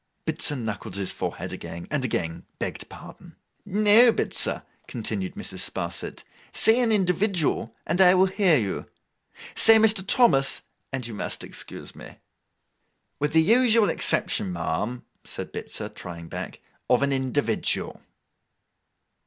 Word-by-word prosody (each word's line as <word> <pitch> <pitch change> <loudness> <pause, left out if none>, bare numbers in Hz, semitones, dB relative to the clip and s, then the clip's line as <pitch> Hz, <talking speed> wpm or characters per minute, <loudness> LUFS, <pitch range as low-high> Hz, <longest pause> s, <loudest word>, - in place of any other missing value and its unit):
Bitzer 145 - 0
knuckled 110 -3 -5
his 100 -2 -1
forehead - - -5
again, 85 +1 -8
and 150 -3 -1
again 85 -9 -3
begged - - -5
pardon. - - -13 0.3
'No, 215 +4 +5
Bitzer,' - - +1 0.2
continued 105 -5 -4
Mrs. - - -5
Sparsit, 85 -1 -5 0.3
'say 225 +2 +4
an 240 -2 +2
individual, 180 - +1
and 180 - +1
I 180 0 +7
will 185 +1 +5
hear 190 -4 +3
you; 105 -6 -3 0.7
say 225 0 +7
Mr. 220 -3 +4
Thomas, 190 - +3 0.3
and 135 -3 -4
you 115 - -6
must 105 - -4
excuse - - -8
me.' - - -12 1.0
'With 150 +1 -1
the 160 0 +5
usual 230 +1 +4
exception, 95 - +1
ma'am,' 90 +8 -3 0.2
said - - -7
Bitzer, - - -5
trying 85 -2 -9
back, - - -7 0.3
'of 125 +2 +3
an 140 0 +1
individual. 130 -3 -1
145 Hz, 130 wpm, -25 LUFS, -, 1.0 s, I